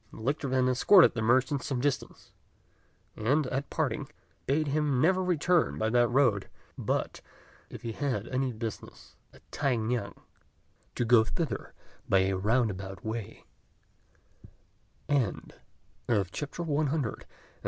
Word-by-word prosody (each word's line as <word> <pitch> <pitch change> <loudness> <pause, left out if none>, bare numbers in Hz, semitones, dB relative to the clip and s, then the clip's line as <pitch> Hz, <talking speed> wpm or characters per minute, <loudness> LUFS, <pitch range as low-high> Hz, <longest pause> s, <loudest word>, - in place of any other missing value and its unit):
The - - -12
lictor 140 +5 -1
then 130 0 +2
escorted 165 +9 +6
the 115 - -3
merchant 130 +4 +2
some 135 -4 -3
distance; 140 +1 -3 0.8
and, 140 +8 +1
at 135 +2 -3
parting, - - -2 0.4
bade 150 +3 +1
him 145 -2 +1
never 185 +6 +3
return 175 -1 +1
by 110 0 0
that 120 0 +4
road, 120 -6 +2 0.3
but, - - -2 0.5
if - - -10
he 115 - -3
had 120 -4 -2
any 130 0 -1
business 110 -1 -8 0.2
at - - -20
T'ai 140 -4 0
ngan, 110 -1 -2 0.8
to 120 - 0
go 115 -1 +6
thither 160 +8 -4 0.3
by 95 - +5
a 95 0 +1
roundabout 95 -2 -1
way. 110 0 -5
125 Hz, 115 wpm, -29 LUFS, 110-145 Hz, 0.8 s, escorted